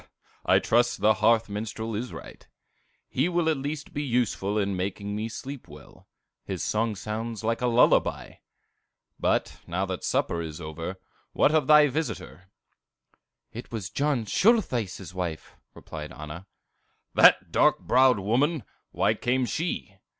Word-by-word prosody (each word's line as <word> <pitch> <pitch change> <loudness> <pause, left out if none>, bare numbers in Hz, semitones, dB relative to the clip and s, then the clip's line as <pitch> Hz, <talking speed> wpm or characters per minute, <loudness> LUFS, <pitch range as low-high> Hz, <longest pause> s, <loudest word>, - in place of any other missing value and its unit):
'" - - -32
"I - - +6
trust 120 +1 +2
the 110 +1 +5
hearth 115 +1 +4
minstrel 110 +2 -5
is 120 +4 -4
right; - - -11 0.6
he 140 +7 0
will 175 -2 0
at 160 -2 +2
least 145 +2 -5
be 145 - -2
useful 115 -6 0
in 100 -2 0
making 100 +2 -3
me 110 +2 -3
sleep 135 +2 -8
well; 75 -2 -15 0.4
his 95 -3 -4
song 110 0 0
sounds 110 +2 -5
like 115 +2 -1
a 125 - +2
lullaby! 120 +1 +2 0.8
But - - 0
now 90 +3 -1
that 95 -2 -5
supper 85 - 0
is 80 -1 -6
over, 80 +4 -6 0.3
what 150 - +3
of 155 -2 +2
thy 150 0 +8
visitor?" 135 - -4 1.0
"It 120 - -9
was 110 -5 -5
John 140 -5 0
Schultheiss' 120 - +1
wife," 85 -4 -5 0.2
replied 75 -1 -8
Anna. 80 +5 -9 0.7
"That - - +6
dark - - +4
browed 130 -2 +4
woman! 125 - +1 0.3
Why - - +1
came 130 +1 0
she?" 120 - -3
110 Hz, 145 wpm, -26 LUFS, 95-130 Hz, 1.0 s, thy